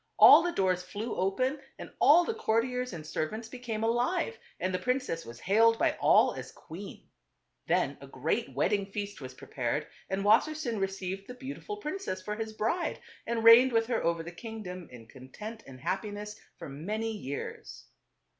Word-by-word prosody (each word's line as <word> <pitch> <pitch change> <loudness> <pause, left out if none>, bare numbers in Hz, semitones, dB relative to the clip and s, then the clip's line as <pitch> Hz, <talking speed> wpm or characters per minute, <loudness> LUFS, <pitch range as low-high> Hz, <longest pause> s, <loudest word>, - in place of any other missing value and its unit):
All - - +10
the 350 - -1
doors 185 - +1
flew 205 +5 -5
open 255 +10 0 0.2
and - - -9
all 340 +4 +7
the 455 - -1
courtiers 250 - 0
and 160 -5 -7
servants 215 +9 -3
became 230 -3 -5
alive, 250 - 0 0.2
and 185 0 -1
the 185 - 0
prin 250 +7 +1
^ - - -5
cess 165 -9 -4
was 115 +1 -10
hailed 225 +4 +4
by - - +2
all - - +5
as - - -8
\*/&£>ser<5eir\5 - - -22
q - - -6
ueen - - -29 0.6
Then - - +1
a - - -10
great - - -2
wed - - +2
f 205 - +3
rince.jj. 200 - -5
ding - - -19
f 200 - -13
ea 205 - 0
st 200 -6 -12
was 130 -1 -7
prepared 130 +3 -3 0.2
and 195 +1 -1
Wassersein 235 0 +2
received 195 0 -3
the 250 - -8
beautiful 280 - -7
princess 375 - -4
for 210 +3 -4
his 220 0 -4
bride, 225 +12 -1 0.3
and 230 -1 -1
reigned 235 +3 +9
with 225 0 +3
her 235 -1 -1
over 170 -1 0
the 170 - -7
kingdom 185 -3 -8
in 120 -2 -11
content 140 - -9
and 130 -1 -11
happiness 205 - -4 0.2
for - - -8
many 210 +11 -3
years. 145 -10 -6
215 Hz, 200 wpm, -30 LUFS, 185-245 Hz, 0.6 s, All